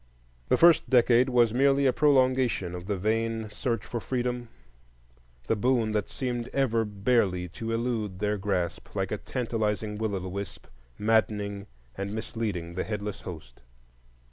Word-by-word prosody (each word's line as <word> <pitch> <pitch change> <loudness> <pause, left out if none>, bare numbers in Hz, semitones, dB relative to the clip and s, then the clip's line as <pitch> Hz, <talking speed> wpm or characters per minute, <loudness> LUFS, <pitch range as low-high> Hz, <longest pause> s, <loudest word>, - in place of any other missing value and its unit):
The 125 - +4
first 170 +1 +5
decade 125 0 +5
was 120 -3 +3
merely 140 +2 +3
a 130 - +4
prolongation 130 - +2
of 90 +1 -7
the 100 -2 -1
vain 110 +2 -1
search 115 +2 -2
for 120 - -4
freedom, 125 0 -2 1.0
the - - +1
boon 115 0 +1
that 105 -1 -1
seemed 120 -2 -3
ever 120 -5 +2
barely 100 -3 +1
to 115 +7 -5
elude 115 -4 -2
their 105 +1 -1
grasp,—like 95 -4 -2
a - - -2
tantalizing 110 -3 -2
will 110 -2 -1
o' - - -1
the 95 - -6
wisp, 100 0 -6 0.3
maddening 105 -2 0 0.3
and 100 +2 -4
misleading 105 -7 -4
the 95 - -2
headless 105 -2 -4
host. 75 -9 -10
110 Hz, 145 wpm, -28 LUFS, 100-125 Hz, 1.0 s, first